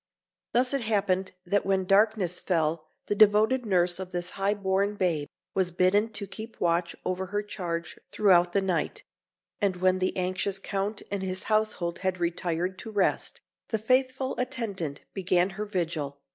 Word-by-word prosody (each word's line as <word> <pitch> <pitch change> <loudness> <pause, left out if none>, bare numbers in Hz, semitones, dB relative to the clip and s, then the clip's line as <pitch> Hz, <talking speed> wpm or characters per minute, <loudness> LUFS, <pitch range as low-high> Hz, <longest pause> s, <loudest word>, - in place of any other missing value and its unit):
Thus 250 +2 +3
it 275 - +1
happened 195 -4 0
that 200 +3 +1
when 190 -1 +1
darkness 195 -2 +3
fell 160 -3 0 0.2
the - - 0
devoted 215 +4 +4
nurse 180 -2 +2
of 185 -1 -6
this 175 0 -3
high 200 +2 0
born 200 +1 0
babe 165 -7 0 0.3
was 190 -2 +1
bidden 185 +5 +3
to 205 - -2
keep 220 +3 -9
watch 170 0 +1
over 185 +1 -2
her 205 +2 -2
charge 170 -5 -4
throughout 180 -4 +4
the 195 +1 +1
night; 175 -5 -1 0.6
and 200 -2 +1
when 185 +1 +2
the 185 +1 -1
anxious 185 +1 -1
Count 200 +2 -3
and 200 -1 -2
his 185 0 -1
household 215 -6 0
had 185 -1 -1
retired 175 +1 -1
to - - -7
rest, 205 -3 0 0.3
the 220 - 0
faithful 260 +3 +1
attendant 220 - -2
began 185 -1 +2
her 210 +3 -4
vigil. 165 -8 -2
190 Hz, 160 wpm, -28 LUFS, 180-210 Hz, 0.6 s, devoted